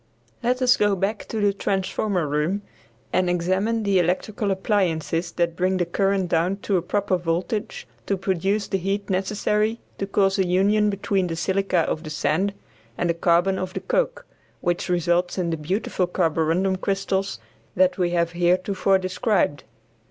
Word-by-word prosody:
Let 250 +2 +1
us 250 0 +5
go 205 -1 +3
back 200 +3 -2
to 220 - -3
the 205 -1 +2
transformer 195 -2 -1
room 150 +8 -1 0.5
and 185 -1 +2
examine 190 +6 0
the 200 -2 +3
electrical 185 +4 0
appliances 180 -4 0
that 170 -1 0
bring 185 +1 +1
the 175 - +1
current 195 +1 +1
down 170 +3 +1
to 200 - 0
a - - 0
proper 200 +2 0
voltage 175 +6 -2 0.2
to 200 - +1
produce 195 +2 0
the 195 - -1
heat 195 +2 -2
necessary 210 +3 0 0.2
to 195 - -2
cause 195 0 +2
a 190 - +2
union 205 +4 +3
between 195 -2 0
the 165 - -3
silica 190 +1 +1
of 160 - -2
the 155 - -8
sand 160 +7 0 0.4
and 175 - +1
the - - -1
carbon 175 +3 +2
of 185 +1 -5
the - - -1
coke, - - -1 0.3
which 175 0 -1
results 175 +1 +1
in 175 -2 0
the - - 0
beautiful 180 +3 -1
carborundum 175 +2 +1
crystals 195 0 -1 0.4
that 185 0 +3
we 175 -1 +2
have 170 -1 +1
heretofore 185 +3 +2
described. 185 - 0
190 Hz, 165 wpm, -23 LUFS, 175-200 Hz, 0.5 s, us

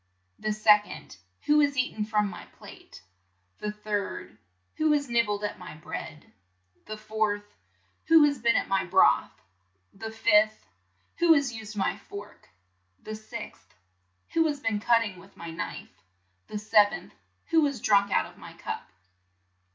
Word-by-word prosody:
The 215 - -1
sec 210 0 +5
ond, - - -10 0.3
'"Who 300 0 +5
has 285 -2 +2
eat 255 - +1
en 210 -1 -2
from 210 -1 +1
my 180 -3 -8
plate? - - -13 0.3
" 90 +1 -45
The 210 - -2
third, 210 - -4 0.4
"Who 310 -1 +3
has 285 -1 0
nib 235 -2 +3
bled 205 0 -2
at 210 - -3
my 150 - -9
bread?" 155 -1 -8 0.5
The 215 - -5
fourth, 215 -1 -1 0.6
"Who 325 -2 +7
has 285 -2 +2
been 235 0 +3
at - - +1
my 195 -1 +1
broth?" 185 +1 +4 0.6
The 220 +3 -7
fifth, 215 -1 +3 0.5
"Who 335 -1 +6
has 280 -4 +1
used 215 -1 -8
my 195 -1 0
fork?" 200 - -11 0.5
The 215 - -6
sixth, 215 0 -10 0.6
"Who 325 -1 +3
has 290 -2 -2
been 225 -5 -1
cut 230 +2 +4
ting 200 -5 -7
with 195 +2 -18
my 170 -1 -7
knife?" 165 - -7 0.5
The 210 - -5
sev 210 0 +5
enth, - - -8 0.4
"Who 325 -1 +5
has 280 -4 -4
drunk 200 -1 +3
out - - +2
of - - -15
my - - -11
cup?" - - -6
215 Hz, 165 wpm, -27 LUFS, 200-235 Hz, 0.6 s, Who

